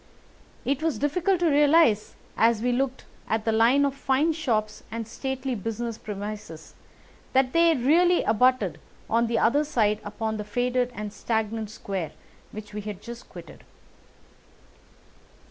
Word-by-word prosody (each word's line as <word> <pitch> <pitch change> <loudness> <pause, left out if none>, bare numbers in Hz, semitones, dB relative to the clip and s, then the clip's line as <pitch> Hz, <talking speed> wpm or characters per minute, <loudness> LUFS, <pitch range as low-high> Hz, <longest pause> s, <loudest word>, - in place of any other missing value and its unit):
It 275 +3 0
was 320 -2 0
difficult 350 +6 +1
to 340 - +4
realise 290 -6 +4 0.2
as 225 -1 +3
we 250 - +2
looked 260 +1 -1 0.2
at 220 0 0
the 225 - +2
line 235 +6 +4
of 280 - 0
fine 280 +4 +1
shops 225 -9 -1
and 225 -1 -5
stately 265 +2 -3
business 225 +1 -4
premises 205 -6 -7 0.6
that 260 -1 +3
they 335 -1 +5
really 335 +8 +3
abutted 250 +4 +2 0.3
on 230 +1 +2
the 230 0 0
other 285 +8 +3
side 215 -8 +1
upon 220 +1 -3
the 210 - -4
faded 245 +3 0
and 210 0 -5
stagnant 220 -1 -2
square 195 -5 -5 0.4
which 210 0 -9
we 210 - -4
had 205 -2 -6
just 235 0 -10
quitted. - - -12
235 Hz, 145 wpm, -26 LUFS, 215-275 Hz, 0.6 s, they